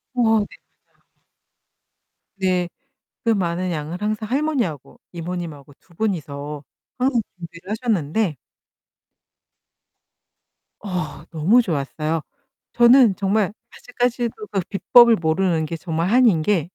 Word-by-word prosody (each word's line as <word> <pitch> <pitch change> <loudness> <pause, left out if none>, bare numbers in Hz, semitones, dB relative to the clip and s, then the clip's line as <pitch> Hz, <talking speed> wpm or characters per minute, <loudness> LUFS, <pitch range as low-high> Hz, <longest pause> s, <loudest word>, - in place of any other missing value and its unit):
어 245 - +1
네 220 -1 +4
맞아요. 205 - -1 1.9
네. 185 -2 0 0.5
그 230 - 0
많은 180 -3 0
양을 160 +4 -5
항상 215 +1 -2
할머니하고 255 - -2
이모님하고 165 -4 -6
두 175 - -25
분이서 150 -7 -3 0.3
항상 255 -2 +2 0.2
준비를 170 +1 -11
하셨는데 215 - 0 2.5
어 180 -7 -4
너무 175 +10 +4
좋았어요. 155 - -2 0.5
저는 240 -3 +6
정말 200 +1 0 0.2
아직까지도 240 -3 -2
그 195 -2 0
비법을 235 +3 +6
모르는 165 0 +1
게 165 +2 -5
정말 165 0 -2
한인 230 -8 +4
게 175 -3 0
185 Hz, 235 characters per minute, -22 LUFS, 165-225 Hz, 2.5 s, 저는